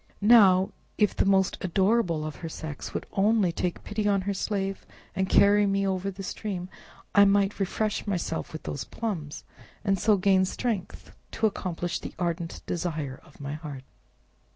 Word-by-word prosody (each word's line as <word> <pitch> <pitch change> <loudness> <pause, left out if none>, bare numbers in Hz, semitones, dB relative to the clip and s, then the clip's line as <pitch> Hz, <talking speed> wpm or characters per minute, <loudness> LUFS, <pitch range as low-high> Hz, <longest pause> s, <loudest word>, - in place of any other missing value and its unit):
Now, 195 -4 +6 0.3
if 210 -2 +2
the - - +2
most 190 -1 +3
adorable 185 -3 +1
of 155 - -6
her 165 - -6
sex 155 -2 -6
would - - -4
only 205 -2 +3
take 175 +1 -3
pity 210 0 -2
on 200 -1 +3
her 200 +2 -2
slave, 195 -1 -2 0.3
and 190 0 0
carry 205 0 +5
me 195 0 +1
over 190 0 -1
the 195 0 -7
stream, 185 -2 -4 0.4
I 200 - +7
might 200 0 +2
refresh 210 +2 -1
myself 175 -4 -2
with 160 - -7
those 140 - -4
plums, 170 -11 -5 0.4
and 195 -2 +1
so 215 0 +4
gain 190 0 +4
strength 210 -1 -4 0.2
to 225 - 0
accomplish 175 -4 -2
the - - -8
ardent 170 -1 -3
desire 155 -6 -3
of 150 - -20
my 140 0 -5
heart!" 150 -4 -7
190 Hz, 165 wpm, -27 LUFS, 170-205 Hz, 0.4 s, I